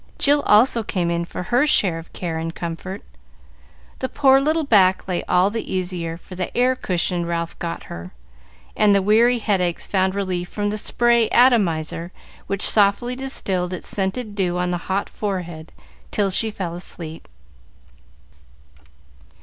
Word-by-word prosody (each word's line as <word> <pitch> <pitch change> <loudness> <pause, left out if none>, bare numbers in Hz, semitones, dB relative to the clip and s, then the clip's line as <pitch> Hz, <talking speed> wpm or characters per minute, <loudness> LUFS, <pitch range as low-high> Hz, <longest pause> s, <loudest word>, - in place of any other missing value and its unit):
Jill 290 0 +3
also 230 +3 +5
came 180 -5 -1
in 170 0 -1
for 180 - -6
her 245 +10 +2
share 185 - +2
of 165 - -13
care 165 -3 -4
and 165 +1 -4
comfort; 175 +3 -6 1.0
the 260 - -2
poor 270 -2 +4
little 310 +3 +1
back 195 -9 +3
lay 180 -2 -2
all 180 +3 +3
the 225 +1 -5
easier 175 -3 -3
for 180 - -13
the 180 -1 -4
air 255 +1 +3
cushion 180 -5 -1
Ralph 170 0 -3
got 170 -1 -4
her, 85 +1 -9 0.6
and 210 -1 +4
the 200 - +3
weary 230 +4 +4
headaches 190 -6 0
found 190 -1 0
relief 185 -3 -2
from 205 -1 -2
the 215 - -2
spray 235 0 +2
atomizer, 175 -9 +2 0.4
which 200 0 -1
softly 215 +4 +2
distilled 190 -9 -3
its 180 - -7
scented 205 +3 -3
dew 180 -3 -1
on 180 0 -1
the 175 - 0
hot 195 +1 0
forehead 175 -6 -5 0.4
till 200 -2 0
she 220 +4 +2
fell 185 -5 -5
asleep. 165 -2 -8
190 Hz, 155 wpm, -21 LUFS, 175-220 Hz, 1.0 s, also